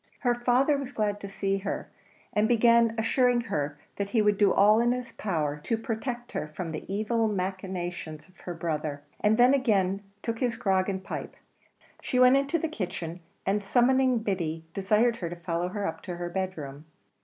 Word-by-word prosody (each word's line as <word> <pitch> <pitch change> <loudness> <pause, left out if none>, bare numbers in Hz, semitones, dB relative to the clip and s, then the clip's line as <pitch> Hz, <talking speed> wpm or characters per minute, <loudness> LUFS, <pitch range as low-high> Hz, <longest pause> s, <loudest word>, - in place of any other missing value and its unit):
Her 245 -2 +3
father 250 +4 +2
was 275 -2 -5
glad 210 -4 -1
to 200 - -6
see 195 0 -1
her, 195 +1 -4 0.5
and 210 +1 +3
began 235 -1 +4
assuring 245 +2 +3
her 150 -9 -3 0.2
that 200 0 -2
he 220 +1 +2
would 210 -1 +2
do 200 -2 +5
all 210 +2 +5
in 240 +1 +3
his 250 -1 -5
power 155 -9 -2
to 230 - 0
protect 240 +2 -4
her - - -3
from 165 +2 -5
the 155 +4 -6
evil 220 +3 +1
machinations 185 -5 -4
of 185 - -24
her 175 - -6
brother, 155 -3 -3 0.2
and 215 +1 +3
then 245 +2 +6
again 200 -8 +2 0.2
took 230 -1 -2
his 245 -2 0
grog 190 -1 +1
and 190 -1 -2
his - - -20
pipe. - - -5 0.7
She 250 - -2
went 255 +1 +7
into 275 +4 +2
the 325 - -1
kitchen, 180 - -5 0.3
and 200 +1 +1
summoning 255 +4 +3
Biddy, 165 -6 -2
desired 215 +4 +2
her 170 - -4
to 175 - -6
follow 170 0 -2
her 205 +1 -3
up 165 - -4
to 180 -3 -6
her 175 0 -4
bedroom. 160 -6 -4
200 Hz, 190 wpm, -28 LUFS, 180-240 Hz, 0.7 s, went